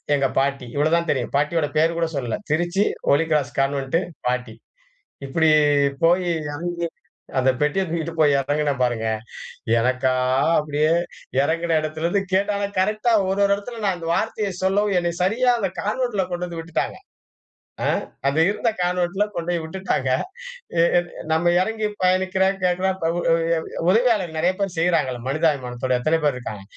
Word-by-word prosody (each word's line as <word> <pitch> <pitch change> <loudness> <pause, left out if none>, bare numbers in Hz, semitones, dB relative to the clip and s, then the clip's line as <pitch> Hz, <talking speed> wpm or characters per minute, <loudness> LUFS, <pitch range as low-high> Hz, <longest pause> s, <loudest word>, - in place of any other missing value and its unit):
எங்க 135 -1 +2
பாட்டி. 135 -1 -1
இவ்வளோ 150 +3 +2
தான் 170 -1 -2
தெரியும். - - -1
பாட்டியோட 150 +1 +1
பேர் 165 +2 +3
கூட 165 -1 +1
சொல்லல. 125 -5 -2
திருச்சி, 175 +5 +1 0.3
ஹோலி 150 +4 +4
கிராஸ் 145 -2 +1
கான்வென்ட்டு, 135 +3 +1 0.3
பாட்டி. 125 -2 -2 0.7
இப்புடி 160 +3 +3 0.5
போய் 175 +2 +3 0.3
எறங்கி 170 +2 -3 0.5
அந்த 130 +1 +3
பெட்டிய 150 +6 +1
தூக்கிட்டு 165 0 -3
போய் 145 -3 +5
எறங்குனேன் 145 0 -1
பாருங்க! 120 -2 0 0.7
எனக்கா 125 +2 +1 0.4
அப்படியே 150 +1 +1 0.5
எறங்கின 165 +2 +1
இடத்திலிருந்து 160 +5 -1
கேட்டா 200 +2 +2
ஆனா 200 - -1
கரெக்டா 215 +4 +1 0.2
ஒரு 195 +1 -1
ஒரு 200 - +1
இடத்துல 225 +2 -8
நான் 190 -2 +1
அந்த 165 -1 -5
வார்த்தைய 215 -1 -1
சொல்லவும் 200 0 +2
என்ன 170 -1 -1
சரியா 245 +6 +3
அந்த 195 -4 -1
கான்வென்ட்ல 210 -3 -1
கொண்டு 175 0 -2
வந்து 170 -1 -6
விட்டுட்டாங்க. 165 0 -3 0.9
ஆ - - +2 0.4
அது 140 +3 +1
இருந்த 210 +3 0
கான்வென்ட்ல 180 +2 0
கொண்டோய் 170 0 -2
விட்டுட்டாங்க. 160 -6 -2 0.7
அ - - +6 0.2
அ - - +6 0.3
நம்ம 170 +2 +3
எறங்கி 220 +2 -1 0.2
பயணிக்கிறேன், 190 +1 +2
கேட்கறேன், 185 +1 +1 0.2
உ - - 0
உ - - +5 0.5
உதவியாளர் 215 -5 +2
நெறைய 175 +3 +2
பேர் 195 -3 -1
செய்றாங்கல, 165 -7 +1
மனிதாபிமானத்தோட 130 -4 0
எத்தன 155 +6 +1
பேர் 145 -3 +2
இருக்காங்க. 110 -5 -7
170 Hz, 150 wpm, -22 LUFS, 145-190 Hz, 0.9 s, அ